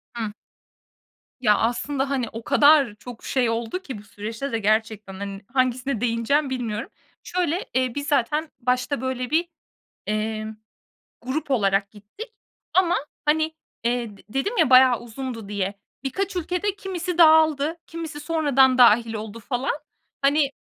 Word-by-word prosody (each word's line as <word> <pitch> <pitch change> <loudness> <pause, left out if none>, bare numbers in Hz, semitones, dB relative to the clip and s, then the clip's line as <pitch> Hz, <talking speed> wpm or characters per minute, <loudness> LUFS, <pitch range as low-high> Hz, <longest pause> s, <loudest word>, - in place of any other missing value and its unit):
Hı. 220 -3 -3 1.1
Ya, 210 -3 +4
aslında, 265 +4 -1
hani, 255 -5 -1
o 225 +1 -7
kadar 285 -5 +5
çok 240 +1 -11
şey 250 -3 +1
oldu 230 +10 -2
ki 265 - -7
bu 205 - -12
süreçte 225 +5 -6
de 230 - -1
gerçekten, 215 -1 0
hani, 200 +1 -6
hangisine 255 -1 0
değineceğim 245 +5 +1
bilmiyorum. 230 -4 -3 0.3
Şöyle, 355 0 -1
eee, 255 -1 +1
biz 285 0 -3
zaten 300 +3 +1
başta 250 +2 0
böyle 255 -1 -3
bir, 335 +3 +1 0.6
eee, 215 +1 -2 0.7
grup 270 +5 -3
olarak 200 -5 +2
gittik. 220 - -11 0.4
Ama, 360 -2 +4 0.3
hani, 315 +1 +1 0.3
eee, 235 -4 -1
d - - -18
dedim 270 - -2
ya 315 -7 +3
bayağı 255 -1 +7
uzundu 240 -2 -7
diye, 200 -1 -2 0.3
birkaç 380 +8 -2
ülkede 360 +4 -1
kimisi 360 -3 -4
dağıldı, 315 -1 +5
kimisi 320 -2 -6
sonradan 280 -5 +3
dâhil 230 -1 +6
oldu 220 +1 -6
falan, 250 +4 -1 0.5
hani 280 0 +3
255 Hz, 140 wpm, -24 LUFS, 225-300 Hz, 1.1 s, bayağı